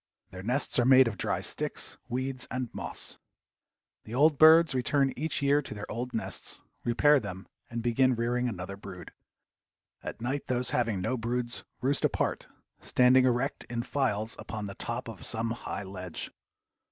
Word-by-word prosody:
Their 95 Hz, -, -8 dB
nests 125 Hz, +6 st, +1 dB
are -, -, +4 dB
made 130 Hz, 0 st, +7 dB
of 115 Hz, -, -2 dB
dry -, -, -1 dB
sticks, -, -, -3 dB
weeds 130 Hz, +1 st, -2 dB
and 130 Hz, -2 st, -3 dB
moss. -, -, -4 dB, 0.9 s
The 115 Hz, -, -6 dB
old 145 Hz, +2 st, +4 dB
birds 160 Hz, 0 st, +8 dB
return 135 Hz, +1 st, +2 dB
each 150 Hz, 0 st, -2 dB
year 140 Hz, +1 st, +4 dB
to 120 Hz, -, -7 dB
their 105 Hz, -, -5 dB
old 125 Hz, +2 st, -3 dB
nests, 115 Hz, -, -4 dB, 0.2 s
repair 145 Hz, +5 st, +4 dB
them 95 Hz, -4 st, -7 dB, 0.2 s
and 115 Hz, -1 st, -4 dB
begin 125 Hz, +2 st, +3 dB
rearing 120 Hz, +2 st, 0 dB
another 100 Hz, -2 st, -5 dB
brood. 95 Hz, -3 st, -9 dB, 0.9 s
At -, -, -6 dB
night 130 Hz, +4 st, -3 dB
those 125 Hz, -1 st, +1 dB
having 115 Hz, -6 st, 0 dB
no 130 Hz, +8 st, -1 dB
broods 120 Hz, +1 st, -2 dB, 0.2 s
roost 135 Hz, +2 st, +1 dB
apart, -, -, 0 dB, 0.3 s
standing 130 Hz, +1 st, +4 dB
erect 125 Hz, +2 st, 0 dB
in 120 Hz, -1 st, -3 dB
files 115 Hz, -6 st, -1 dB
upon 110 Hz, -2 st, -5 dB
the 100 Hz, -, -5 dB
top 120 Hz, +5 st, -4 dB
of 110 Hz, -5 st, -7 dB
some 115 Hz, 0 st, -1 dB
high 115 Hz, -3 st, -4 dB
ledge. 95 Hz, -3 st, -5 dB
120 Hz, 165 wpm, -29 LUFS, 110-130 Hz, 0.9 s, birds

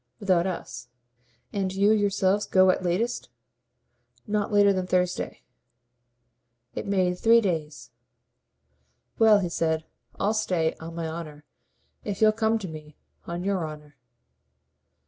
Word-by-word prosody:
"Without 185 Hz, -4 st, +2 dB
us." 170 Hz, -8 st, -6 dB, 0.7 s
"And 195 Hz, -2 st, -1 dB
you 200 Hz, +2 st, +3 dB
yourselves 205 Hz, -1 st, +1 dB
go 185 Hz, 0 st, +5 dB
at -, -, -2 dB
latest 190 Hz, +7 st, -1 dB, 0.5 s
?" 120 Hz, 0 st, -48 dB, 0.2 s
"Not 210 Hz, 0 st, -1 dB
later 205 Hz, -1 st, +5 dB
than 185 Hz, -1 st, -2 dB
Thursday." 180 Hz, -1 st, -1 dB, 1.3 s
It -, -, -5 dB
made 185 Hz, -2 st, +1 dB
three 230 Hz, +1 st, +6 dB
days. 155 Hz, -, -3 dB, 1.3 s
"Well," 220 Hz, -2 st, +7 dB
he 180 Hz, -, -2 dB
said, 160 Hz, -1 st, -1 dB, 0.3 s
"I'll 205 Hz, +2 st, +1 dB
stay, 180 Hz, -7 st, 0 dB
on 165 Hz, +1 st, -8 dB
my 165 Hz, -1 st, -3 dB
honour, 155 Hz, -2 st, -8 dB, 0.6 s
if 200 Hz, -2 st, -4 dB
you'll 215 Hz, -1 st, +6 dB
come 220 Hz, +1 st, +1 dB
to 205 Hz, -4 st, -6 dB
me. 155 Hz, -2 st, -10 dB, 0.3 s
On 170 Hz, +1 st, -4 dB
YOUR 195 Hz, -3 st, 0 dB
honour." 150 Hz, -1 st, -11 dB
185 Hz, 130 wpm, -26 LUFS, 160-205 Hz, 1.3 s, Well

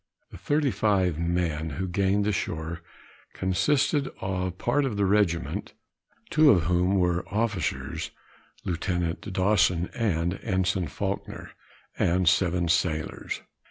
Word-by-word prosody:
The -, -, -9 dB
thirty 145 Hz, -2 st, +1 dB
five 95 Hz, -8 st, +1 dB
men 85 Hz, -2 st, -1 dB
who 95 Hz, +1 st, -2 dB
gained 100 Hz, +2 st, +1 dB
the 105 Hz, -, +2 dB
shore, 80 Hz, -3 st, -3 dB, 0.5 s
consisted 140 Hz, -, +1 dB
of 95 Hz, -1 st, -2 dB
part 140 Hz, +8 st, +1 dB
of 125 Hz, -7 st, -2 dB
the 100 Hz, -, +2 dB
regiment, 95 Hz, -4 st, 0 dB, 0.6 s
two 155 Hz, -1 st, +6 dB
of 90 Hz, -, +5 dB
whom 90 Hz, +4 st, +2 dB
were 90 Hz, -1 st, +1 dB
officers, 105 Hz, -3 st, -2 dB, 0.6 s
Lieutenant 90 Hz, +2 st, -2 dB
Dawson 90 Hz, -2 st, +2 dB
and 90 Hz, -5 st, 0 dB
Ensign 95 Hz, -3 st, 0 dB
Faulkner, 70 Hz, -, -4 dB, 0.5 s
and 90 Hz, +1 st, +2 dB
seven 90 Hz, 0 st, +3 dB
sailors. 80 Hz, -2 st, -1 dB
95 Hz, 120 wpm, -27 LUFS, 85-105 Hz, 0.6 s, two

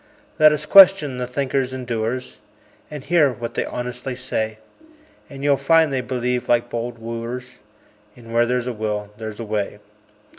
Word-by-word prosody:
Let 155 Hz, 0 st, +8 dB
us 150 Hz, 0 st, -2 dB
question 180 Hz, -9 st, +6 dB
the 125 Hz, -, -3 dB
thinkers 130 Hz, 0 st, -1 dB
and 130 Hz, -1 st, -6 dB
doers, 120 Hz, +2 st, -3 dB, 0.5 s
And 150 Hz, -3 st, -8 dB
hear 160 Hz, -5 st, +3 dB
what 120 Hz, -1 st, -6 dB
they -, -, -1 dB
honestly 125 Hz, +1 st, -5 dB
say; 110 Hz, -3 st, -3 dB, 0.7 s
And 140 Hz, -1 st, -9 dB
you'll 145 Hz, -1 st, +3 dB
find 160 Hz, -2 st, +3 dB
they 130 Hz, -, 0 dB
believe, 125 Hz, 0 st, -2 dB
like 120 Hz, 0 st, +2 dB
bold 120 Hz, 0 st, -4 dB
wooers, 115 Hz, +3 st, -6 dB, 0.6 s
In 115 Hz, -2 st, -13 dB
"Where 120 Hz, 0 st, +3 dB
there's 125 Hz, 0 st, -1 dB
a 125 Hz, -, -3 dB
will 105 Hz, -2 st, -4 dB
there's 110 Hz, -1 st, -7 dB
a 115 Hz, -, -5 dB
way." 105 Hz, -1 st, -3 dB
125 Hz, 170 wpm, -21 LUFS, 115-135 Hz, 0.7 s, Let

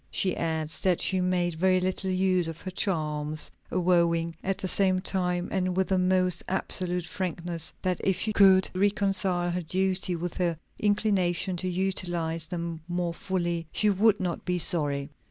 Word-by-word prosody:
She 185 Hz, -2 st, +1 dB
adds 160 Hz, -1 st, -2 dB
that 185 Hz, -3 st, +1 dB
she 190 Hz, -1 st, +1 dB
made 180 Hz, -1 st, 0 dB
very 185 Hz, +3 st, +2 dB
little 185 Hz, +1 st, -1 dB
use 185 Hz, -2 st, +1 dB
of 165 Hz, 0 st, -6 dB
her 185 Hz, -, -6 dB
charms; 155 Hz, -5 st, -1 dB, 0.2 s
avowing 170 Hz, -2 st, +1 dB
at 195 Hz, 0 st, -1 dB
the 190 Hz, -, -3 dB
same 185 Hz, 0 st, +3 dB
time, 180 Hz, -1 st, 0 dB
and 185 Hz, -1 st, -1 dB
with 190 Hz, 0 st, +1 dB
the 190 Hz, -1 st, +2 dB
most 185 Hz, -1 st, +1 dB
absolute 180 Hz, -2 st, -1 dB
frankness, 170 Hz, -2 st, -4 dB
that 185 Hz, -2 st, -1 dB
if 190 Hz, -2 st, +1 dB
she 215 Hz, +3 st, 0 dB
could 190 Hz, -2 st, +6 dB
reconcile 190 Hz, -2 st, +1 dB
her 180 Hz, +1 st, -2 dB
duty 185 Hz, +2 st, 0 dB
with 170 Hz, 0 st, -5 dB
her 175 Hz, -3 st, 0 dB, 0.2 s
inclination 195 Hz, -3 st, +1 dB
to 185 Hz, +1 st, -1 dB
utilize 175 Hz, -3 st, -1 dB
them 170 Hz, -1 st, -5 dB
more 175 Hz, -1 st, -2 dB
fully, 175 Hz, -2 st, -2 dB
she 210 Hz, -1 st, +3 dB
would 205 Hz, +2 st, +3 dB
not 180 Hz, -2 st, -3 dB
be 180 Hz, -1 st, 0 dB
sorry. 145 Hz, -4 st, +1 dB
180 Hz, 165 wpm, -27 LUFS, 170-190 Hz, 0.2 s, could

